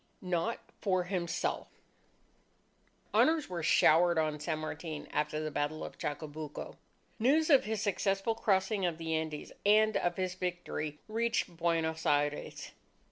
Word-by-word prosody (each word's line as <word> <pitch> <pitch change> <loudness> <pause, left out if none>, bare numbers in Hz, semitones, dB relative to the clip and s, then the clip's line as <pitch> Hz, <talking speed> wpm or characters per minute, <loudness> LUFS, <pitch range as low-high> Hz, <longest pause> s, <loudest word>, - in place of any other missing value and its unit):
NOT 180 +5 -1 0.2
FOR 185 -3 +2
HIMSELF 175 -2 -2 1.5
Honours 315 -2 +4
were 175 -2 -3
showered 170 +2 +5
on 155 -1 0
San 155 +1 -2
Martin 155 0 -5
after 150 0 -1
the 155 0 -3
battle 145 +2 -2
of - - -8
Chacabuco. 150 0 -5 0.4
News 305 +8 +3
of 275 - +6
his 215 -1 -2
successful 195 +1 +1
crossing 195 -2 +1
of 170 -3 0
the 165 -1 -3
Andes 160 -2 -3
and 215 +1 +5
of 175 0 -1
his 185 -1 -1
victory, 180 -5 -4
reached 230 -4 0
Buenos 165 -1 0
Aires. 145 0 0
175 Hz, 135 wpm, -32 LUFS, 155-200 Hz, 1.5 s, of